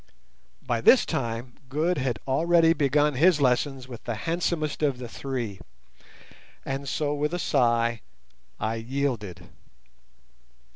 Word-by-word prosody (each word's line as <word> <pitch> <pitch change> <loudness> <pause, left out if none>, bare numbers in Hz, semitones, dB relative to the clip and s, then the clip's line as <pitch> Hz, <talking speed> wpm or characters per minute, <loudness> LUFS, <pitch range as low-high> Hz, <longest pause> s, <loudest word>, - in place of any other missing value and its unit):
By - - -1
this - - +6
time 115 +1 -3 0.2
Good 155 +4 0
had 130 -4 -1
already 165 +4 +4
begun 150 -1 +2
his 160 +4 +4
lessons 130 0 +1
with 120 -3 -10
the 120 - -2
handsomest 165 -3 -1
of 140 -4 +1
the 125 -1 -7
three, 120 -5 -5 1.1
and 135 +1 -3
so 145 -1 -1
with 150 +3 -1
a - - -1
sigh 120 -7 +1 0.6
I 110 +1 -1
yielded. 115 -8 -3
135 Hz, 125 wpm, -26 LUFS, 120-150 Hz, 1.1 s, this